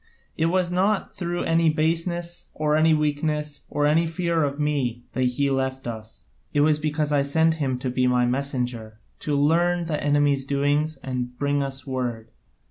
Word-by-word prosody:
It 160 - +1
was 180 0 +1
not 195 +3 0
through 175 -1 -2
any 165 0 +3
baseness, 170 +2 -1
or 150 0 +1
any 160 +1 +4
weakness, 150 0 -1
or 145 - 0
any 160 +3 +3
fear 165 -1 0
of 140 0 -2
me, 135 -5 -1
that 130 - -1
he 135 +3 +1
left 130 0 -1
us; 110 -2 -7 0.3
it 145 - +3
was 150 0 +3
because 150 -1 -1
I 145 -1 +3
sent 160 +3 +2
him 130 -3 0
to 125 0 -3
be 125 0 +1
my 125 -1 +3
messenger, 125 -4 -2 0.2
to 145 -1 -1
learn 170 +4 +2
the 155 -2 -2
enemy's 145 -2 +2
doings 145 +2 +1
and 125 -2 -4
bring 145 +1 0
us 135 -1 -4
word. 120 -4 -4
145 Hz, 175 wpm, -24 LUFS, 130-160 Hz, 0.3 s, any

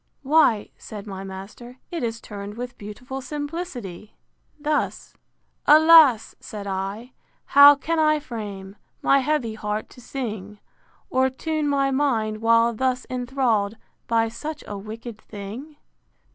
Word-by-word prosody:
Why, 270 -7 +3
said 210 -2 -9
my 195 -2 -7
master, 195 +6 -9
it 340 -2 -3
is 230 -1 -2
turned 205 0 -8
with 245 0 -6
beautiful 250 +6 -7
simplicity, 285 - -6 0.4
thus: 295 0 -2 0.5
IV. 300 - +9
Alas! 310 -7 +7
said 205 -2 -8
I, 195 +5 -4 0.3
how 285 +1 +9
can 320 +4 -2
I 305 -1 +3
frame 205 -7 -7 0.3
My 275 - +5
heavy 265 -5 0
heart 215 0 -4
to 250 - -15
sing, 215 -6 -6 0.5
Or 260 0 +3
tune 310 +3 -2
my 275 -1 +1
mind, 225 -6 0
while 230 +1 +4
thus 255 +2 -1
enthrall'd 245 -5 0 0.3
By 225 -1 +2
such 295 +7 -6
a 205 - -6
wicked 220 +2 -8
thing? 220 +9 -9
240 Hz, 130 wpm, -24 LUFS, 210-285 Hz, 0.5 s, IV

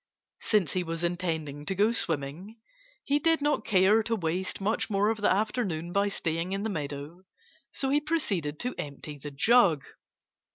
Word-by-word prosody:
Since 205 -9 +1
he 185 - 0
was 165 0 -3
intending 160 -5 -2
to 195 - -1
go 210 +4 +3
swimming, 170 +3 -3 0.4
he 285 +1 +2
did 325 +2 +3
not 295 +1 +1
care 200 +2 +4
to 230 +1 -1
waste 180 0 -2
much 210 +4 -1
more 205 0 +2
of 220 -1 -1
the - - +3
afternoon 190 -5 -1
by 200 +1 +2
staying 170 -1 -2
in 195 +1 -2
the 220 - -1
meadow. 150 +1 -5 0.5
So 270 -1 -1
he 295 +1 +3
proceeded 215 - -1
to 250 +1 -2
empty 145 0 -6
the 145 - -6
jug. 165 - +4
190 Hz, 170 wpm, -28 LUFS, 160-220 Hz, 0.5 s, care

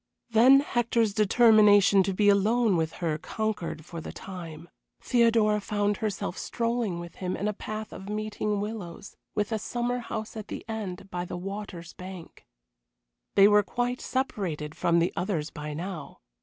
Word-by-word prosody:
Then 255 +5 +7
Hector's 235 -5 +1
determination 210 -2 +6
to 195 +1 0
be 205 +1 +3
alone 210 +2 +4
with 160 -1 0
her 155 -1 0
conquered 180 -7 -3
for 170 -1 -7
the - - -7
time. 170 -4 -9 0.3
Theodora 225 -3 +3
found 205 0 0
herself 200 -3 -3
strolling 230 -6 -1
with 170 0 -9
him 185 -1 -3
in 205 - -2
a 210 - 0
path 215 +1 -6
of 190 - -8
meeting 210 -1 -2
willows, 200 -2 -6 0.2
with 210 +2 -1
a 220 - 0
summer 245 +3 -2
house 220 -2 -5
at 215 -1 -6
the - - -7
end, 195 -4 -5
by 175 0 -2
the 180 - -5
water's 190 -2 -7
bank. 185 -2 -10 0.9
They 200 0 +8
were 210 0 +6
quite 245 +4 -2
separated 180 - -2
from 170 +1 +1
the 170 +1 +2
others 170 -5 -2
by 150 -1 -6
now. 170 -2 -6
205 Hz, 160 wpm, -27 LUFS, 180-220 Hz, 0.9 s, They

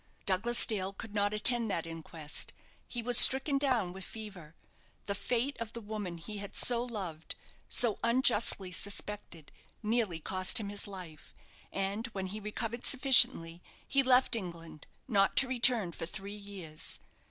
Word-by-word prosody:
Douglas 215 +6 +3
Dale 195 -3 -3
could 205 +1 -10
not 205 -1 0
attend 230 +2 +3
that 170 -4 -3
inquest. 165 -2 -4 0.3
He 240 -1 -4
was 245 0 +7
stricken 270 +1 +7
down 245 -10 -1
with 190 0 -9
fever; 190 -9 -10 0.5
the 200 - -3
fate 245 +7 -2
of 225 -1 -6
the 235 - -7
woman 205 -5 -6
he 205 +5 -8
had 200 0 -9
so 240 -1 +3
loved, 190 -10 -6 0.3
so 235 -4 +3
unjustly 230 -5 +2
suspected, 200 -4 -4 0.3
nearly 215 -6 -1
cost 185 +5 +1
him 205 -2 -5
his 205 0 -3
life, 180 -6 -11 0.4
and 200 +4 -3
when 190 -1 -4
he 200 +3 -6
recovered 225 +3 -6
sufficiently, 245 - +4 0.3
he 275 - +2
left 255 -2 +3
England, 170 -7 -8 0.2
not 200 -5 +1
to 270 - +4
return 240 -6 +2
for 165 - -7
three 195 +3 -8
years. 195 -7 -5
205 Hz, 155 wpm, -31 LUFS, 185-235 Hz, 0.5 s, was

